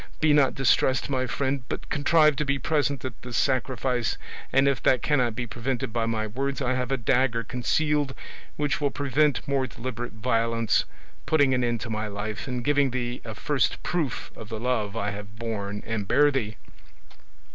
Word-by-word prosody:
Be 155 -1 +4
not 140 -3 +4
distressed, 135 0 +2
my 130 -1 0
friend, 140 0 -1
but - - -4
contrive 155 +1 +4
to 150 - +1
be 140 -1 0
present 140 -1 0
at 130 -3 -6
this 125 -1 -4
sacrifice, 130 -2 0 0.3
and 135 +2 +4
if 140 -5 +1
that 130 - +3
cannot 125 -6 +2
be 125 - -2
prevented 120 -1 -3
by 115 -1 0
my 110 -1 -1
words, 135 +6 -2
I 130 -2 0
have 125 0 -2
a 135 - +2
dagger 120 -1 +2
concealed 145 +4 0 0.4
which 145 0 -1
will 145 - +2
prevent 145 +1 +1
more 135 -1 +1
deliberate 120 0 -5
violence, 115 0 +1 0.4
putting 145 -4 +4
an 125 -1 +1
end 120 -1 0
to 115 - -4
my 110 0 -2
life 105 +3 -5
and 125 -2 -3
giving 145 -1 +3
thee 120 0 -3
a 110 -2 -7
first 145 -4 0
proof 160 -8 -2
of 110 - -9
the 110 -1 -4
love 115 -3 -1
I 105 -1 -1
have 105 +1 -8
borne 105 -3 -4
and 105 -3 -3
bear 145 +5 +5
thee. 110 -6 -2
125 Hz, 185 wpm, -26 LUFS, 115-140 Hz, 0.4 s, bear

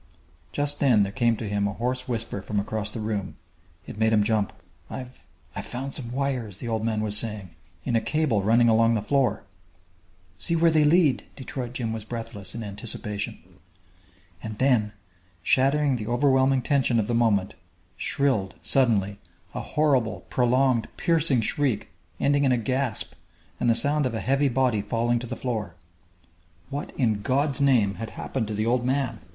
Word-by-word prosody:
Just 145 0 -1
then 120 -7 +5
there 100 - -2
came 120 -1 +2
to 110 - -4
him 100 0 0
a 100 - -3
hoarse 125 +3 -2
whisper 115 -4 -3
from 105 +1 -2
across 105 +1 -3
the 110 - -6
room. 105 -3 -3 0.5
It 105 - -9
made 110 0 +3
him 105 -1 +4
jump. 105 -2 +1 0.4
"I've 130 -1 -9 0.3
I've - - -5
found 135 +2 -5
some 120 -4 -4
wires," 125 -7 -2
the 120 - -6
old 110 -1 -1
man 110 -1 0
was 105 -1 0
saying, 105 -4 -3 0.3
"in 120 - 0
a 115 - +3
cable 150 -9 +1
running 115 +4 +4
along 115 0 +4
the 105 - -1
floor 135 +1 +1 0.5
" 90 +1 -35
"See 170 - +1
where 165 0 +4
they 155 -1 +4
lead!" 155 -3 +4
Detroit 130 -2 -6
Jim 115 -3 -2
was 110 -1 -4
breathless, 110 -4 -6
in 115 - -4
anticipation. 105 -2 -5 1.0
And 110 -1 -6
then, 115 -5 +2 0.5
shattering 135 - +3
the 110 -2 -5
overwhelming 130 +1 +3
tension 135 -4 +2
of 105 - +1
the 120 - -2
moment, 105 -4 +2 0.4
shrilled, 130 -9 0
suddenly, 105 -7 +2 0.3
a - - -3
horrible, 125 -10 +1
prolonged, 125 -1 +2
piercing 160 -7 +2
shriek 125 -1 -1 0.3
ending 145 0 +2
in 135 - +3
a 125 - +3
gasp 130 0 -1 0.5
and 120 - +2
the 115 - +4
sound 145 +4 +2
of 120 - -4
a - - -1
heavy 135 +4 +2
body 125 -4 +1
falling 115 +3 0
to 120 - -6
the - - -4
floor! 110 -9 -3 1.0
What, 145 +1 -4
in 110 -6 +1
God's 140 +4 +1
name, 120 -8 +3
had 115 - -4
happened 120 -5 -2
to 105 - -3
the 110 +1 0
old 120 +1 +2
man? 130 -3 0
120 Hz, 175 wpm, -26 LUFS, 105-135 Hz, 1.0 s, then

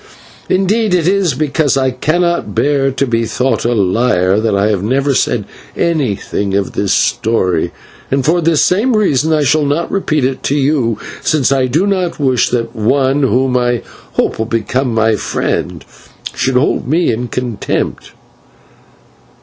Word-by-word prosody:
Indeed, 195 +2 +1
it 170 -2 +1
is 190 -7 +1
because 145 -1 0
I 130 -1 +1
cannot 170 +7 -1
bear 140 -1 +2
to 135 +1 -1
be 115 -2 0
thought 130 +2 -1
a 120 0 +1
liar, 95 -1 +2
that 110 -2 0
I 100 +2 +2
have 100 -4 0
never 135 +6 0
said 120 -4 0 0.3
anything 105 - -1
of 100 -1 -1
this 100 -1 -1
story, 95 -9 +1 0.4
and 135 -1 0
for 170 +3 +2
this 165 -2 +2
same 220 +7 +2
reason 160 -8 +1
I 155 -1 +2
shall 150 +2 +2
not 145 +4 -1
repeat 155 -8 0
it 130 0 -2
to 140 - -1
you, 135 -6 +1 0.2
since 140 -4 +1
I 135 -2 +2
do 155 +10 +1
not 185 -5 -1
wish 130 -4 +2
that 115 -1 -2
one 135 +5 +1
whom 130 -1 +1
I 120 -1 0 0.3
hope - - -1
will 110 - -1
become 120 +3 -1
my 110 0 +2
friend - - -3 0.5
should 130 0 -1
hold 125 -1 +1
me 165 +5 +2
in 120 +2 -3
contempt. 120 -3 -3
130 Hz, 160 wpm, -14 LUFS, 115-155 Hz, 0.5 s, bear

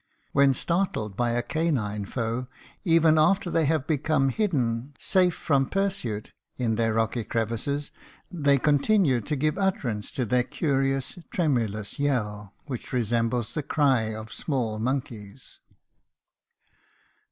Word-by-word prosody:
When 140 -1 +4
startled 170 - -1
by 120 +2 +1
a 120 0 0
canine 120 -11 -1
foe, 115 +3 -3 0.4
even 165 -2 +4
after 180 +3 +3
they 165 -1 +2
have 150 -2 +1
become 150 -2 +1
hidden, 135 - -1
safe 180 -3 +2
from 135 -3 +1
pursuit, 190 - -2 0.3
in 120 -3 0
their 115 0 +1
rocky 115 +1 0
crevices, 115 +7 -2 0.4
they 145 -5 +3
continue 145 - +3
to 150 +8 -2
give 155 +6 0
utterance 125 - -1
to 130 - -1
their 125 +3 +2
curious, 135 +2 -1
tremulous 115 - -1
yell, 105 -8 -1
which 130 -5 -6
resembles 120 -1 0
the 155 - -1
cry 135 -6 +2
of 110 0 -8
small 120 -7 -2
monkeys. 125 -2 -4
135 Hz, 125 wpm, -26 LUFS, 115-155 Hz, 0.4 s, When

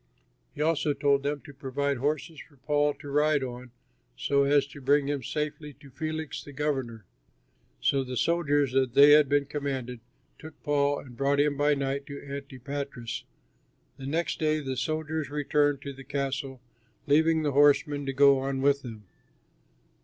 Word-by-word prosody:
He 150 - -1
also 155 -2 +1
told 140 -1 +2
them 145 0 -3
to 145 - -11
provide 140 +1 -2
horses 150 +4 -2
for 145 - -15
Paul 145 +2 +1
to 145 - -12
ride 150 0 +2
on 125 0 -7 0.5
so 140 - +2
as 140 0 +3
to 145 0 -11
bring 145 +2 +3
him 145 -1 -1
safely 150 +2 -4
to 140 0 -17
Felix 155 +2 -4
the 145 - -11
governor. 130 -7 -3 0.8
So 135 - +2
the 125 -1 -5
soldiers, 145 -5 +1
as 135 0 +3
they 140 +1 +8
had 150 -2 +6
been 145 0 +2
commanded, 135 -4 -4 0.4
took 160 -1 -12
Paul 145 -1 +1
and 125 -3 -11
brought 140 +2 +1
him 145 0 +2
by 145 +1 +2
night 140 0 -3
to 140 -1 -7
Antipatris. 140 -3 -6 0.7
The 135 - -7
next 165 +4 -1
day 155 -1 +1
the 135 -3 -4
soldiers 155 +3 -2
returned 145 -1 +1
to 140 - -6
the 135 0 -12
castle, 135 -1 -3 0.4
leaving 160 +2 +3
the 145 - +1
horsemen 145 0 +3
to 135 - -1
go 140 0 +5
on 135 0 -2
with 140 0 +3
him. 110 -4 -9
140 Hz, 170 wpm, -28 LUFS, 135-150 Hz, 0.8 s, they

